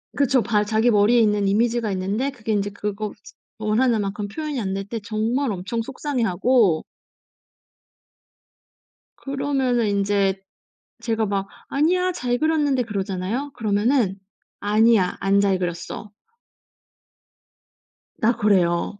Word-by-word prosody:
그쵸. 270 Hz, -3 st, +2 dB
발 210 Hz, -1 st, +1 dB
자기 220 Hz, +3 st, +2 dB
머리에 210 Hz, +3 st, +4 dB
있는 210 Hz, -2 st, +2 dB
이미지가 225 Hz, +2 st, +1 dB
있는데 200 Hz, +8 st, -1 dB
그게 230 Hz, -5 st, -5 dB
인제 205 Hz, -1 st, 0 dB
그거 205 Hz, +1 st, -4 dB, 0.4 s
원하는 220 Hz, +1 st, +1 dB
만큼 205 Hz, +1 st, -3 dB
표현이 300 Hz, +5 st, -4 dB
안 190 Hz, -2 st, -2 dB
될 195 Hz, 0 st, -4 dB
때 230 Hz, +2 st, -4 dB
정말 225 Hz, +5 st, -1 dB
엄청 195 Hz, +5 st, -3 dB
속상해하고 230 Hz, -, +1 dB, 2.4 s
그러면은 270 Hz, -4 st, 0 dB
인제 200 Hz, -1 st, +1 dB, 0.6 s
제가 225 Hz, -1 st, 0 dB
막 195 Hz, -1 st, -2 dB, 0.2 s
"아니야, 360 Hz, +6 st, +2 dB
잘 245 Hz, -8 st, -1 dB
그렸는데." 295 Hz, -3 st, +1 dB
그러잖아요. 200 Hz, +5 st, -3 dB
그러면은 215 Hz, -1 st, +1 dB, 0.4 s
"아니야, 210 Hz, -2 st, +3 dB
안 195 Hz, +1 st, +2 dB
잘 195 Hz, -2 st, +2 dB
그렸어." 175 Hz, +3 st, -5 dB, 2.1 s
나 235 Hz, +2 st, +2 dB
그래요. 195 Hz, -2 st, +1 dB
215 Hz, 255 characters per minute, -22 LUFS, 200-245 Hz, 2.4 s, 머리에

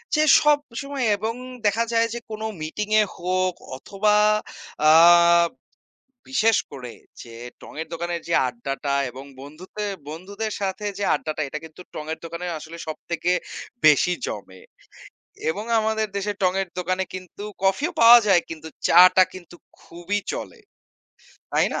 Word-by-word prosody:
যে 305 Hz, -, +3 dB, 0.2 s
সবসময় 285 Hz, -2 st, 0 dB
এবং 220 Hz, +3 st, -2 dB, 0.3 s
দেখা 210 Hz, +3 st, +2 dB
যায় 230 Hz, 0 st, +3 dB
যে 240 Hz, -, -4 dB
কোনো 215 Hz, 0 st, -5 dB, 0.2 s
মিটিং 165 Hz, +7 st, -4 dB
এ -, -, +4 dB
হোক 185 Hz, 0 st, -1 dB, 0.2 s
অথবা 205 Hz, +8 st, 0 dB, 0.7 s
আ -, -, +7 dB, 1.4 s
বিশেষ 225 Hz, -3 st, +3 dB, 0.2 s
করে 125 Hz, -4 st, -8 dB, 0.3 s
যে 115 Hz, -1 st, -12 dB, 0.3 s
টঙের 160 Hz, +2 st, -7 dB
দোকানের 170 Hz, +1 st, -3 dB
যে 170 Hz, -, 0 dB
আড্ডাটা 135 Hz, +3 st, -4 dB, 0.2 s
এবং 130 Hz, +2 st, -10 dB, 0.2 s
বন্ধুতে 170 Hz, +9 st, -8 dB, 0.2 s
বন্ধুদের 200 Hz, +7 st, -5 dB
সাথে 195 Hz, +1 st, -3 dB
যে 205 Hz, -, -1 dB
আড্ডাটা 155 Hz, 0 st, -3 dB
এটা 150 Hz, -, -5 dB
কিন্তু 160 Hz, +2 st, -13 dB
টঙের 155 Hz, +1 st, -5 dB
দোকানের 170 Hz, +2 st, -5 dB
আসলে 160 Hz, +2 st, -10 dB
সবথেকে 170 Hz, +2 st, -2 dB, 0.5 s
বেশি 155 Hz, +3 st, +5 dB
জমে। 95 Hz, -2 st, -8 dB, 0.9 s
এবং 205 Hz, +6 st, -5 dB
আমাদের 220 Hz, 0 st, 0 dB
দেশে 200 Hz, +1 st, -1 dB
টঙের 190 Hz, +1 st, +1 dB
দোকানে 185 Hz, +1 st, -1 dB
কিন্তু 185 Hz, +2 st, -8 dB, 0.2 s
কফিও 195 Hz, -, +1 dB
পাওয়া 235 Hz, +1 st, +10 dB
যায় 185 Hz, -4 st, +4 dB
কিন্তু 160 Hz, -1 st, -8 dB, 0.2 s
চা-টা 185 Hz, +2 st, +7 dB
কিন্তু 175 Hz, -2 st, -12 dB, 0.2 s
খুবই 175 Hz, +4 st, -4 dB
চলে। 465 Hz, -, -7 dB, 0.9 s
তাই -, -, +3 dB
না? -, -, -2 dB
185 Hz, 135 wpm, -23 LUFS, 160-210 Hz, 1.4 s, পাওয়া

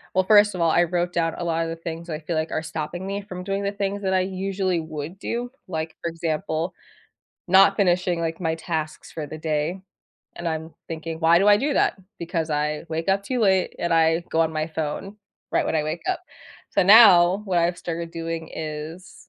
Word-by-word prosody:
well, 185 Hz, -, +4 dB
first 205 Hz, -1 st, +6 dB
of 175 Hz, -, -3 dB
all, 165 Hz, -1 st, +4 dB
I 175 Hz, -, +4 dB
wrote 175 Hz, +1 st, -1 dB
down 165 Hz, -1 st, 0 dB
a -, -, -4 dB
lot 165 Hz, -1 st, 0 dB
of 165 Hz, -, -3 dB
the 165 Hz, -, -4 dB
things 165 Hz, 0 st, -7 dB
that 165 Hz, -, -4 dB
I -, -, -6 dB
feel 165 Hz, +1 st, -4 dB
like 155 Hz, +1 st, -1 dB
are 160 Hz, -, -2 dB
stopping 160 Hz, +3 st, -5 dB
me 200 Hz, +1 st, -3 dB
from 180 Hz, -2 st, -8 dB
doing 195 Hz, +1 st, -2 dB
the 200 Hz, -, 0 dB
things 200 Hz, 0 st, -3 dB
that 190 Hz, -1 st, 0 dB
I 185 Hz, -, +3 dB
usually 190 Hz, -1 st, -1 dB
would 160 Hz, +2 st, -6 dB
do. 240 Hz, +3 st, -3 dB, 0.2 s
Like, 160 Hz, -2 st, -4 dB
for 170 Hz, -, -2 dB
example, 165 Hz, 0 st, -2 dB, 0.7 s
not 195 Hz, +2 st, +6 dB
finishing, 180 Hz, -2 st, +2 dB
like, 165 Hz, 0 st, -2 dB
my 160 Hz, -1 st, 0 dB
tasks 160 Hz, -2 st, -4 dB
for 155 Hz, -2 st, -5 dB
the 155 Hz, -, -7 dB
day, 155 Hz, +3 st, -1 dB, 0.6 s
and 175 Hz, -, -6 dB
I'm 160 Hz, 0 st, -3 dB
thinking, 165 Hz, 0 st, -5 dB
"Why 165 Hz, +1 st, +5 dB
do 200 Hz, +3 st, +3 dB
I 205 Hz, -, +8 dB
do 280 Hz, +5 st, 0 dB
that? -, -, +2 dB, 0.2 s
Because 165 Hz, -2 st, -3 dB
I 150 Hz, +1 st, -1 dB
wake 165 Hz, +3 st, -3 dB
up 195 Hz, +1 st, +2 dB
too 250 Hz, +4 st, -2 dB
late, 190 Hz, -3 st, +3 dB
and 170 Hz, -1 st, -1 dB
I 165 Hz, 0 st, +4 dB
go 160 Hz, -, +2 dB
on 160 Hz, -, -1 dB
my 155 Hz, 0 st, -1 dB
phone 160 Hz, +6 st, -4 dB, 0.3 s
right -, -, +1 dB
when -, -, 0 dB
I 155 Hz, -, +1 dB
wake 155 Hz, +3 st, -4 dB
up." 370 Hz, -, 0 dB, 0.5 s
So -, -, +3 dB
now 190 Hz, -3 st, +8 dB
what 185 Hz, -2 st, 0 dB
I've 175 Hz, +1 st, +1 dB
started 170 Hz, -1 st, -4 dB
doing 165 Hz, -1 st, -5 dB
is 155 Hz, +3 st, -7 dB
170 Hz, 220 wpm, -24 LUFS, 160-190 Hz, 0.7 s, I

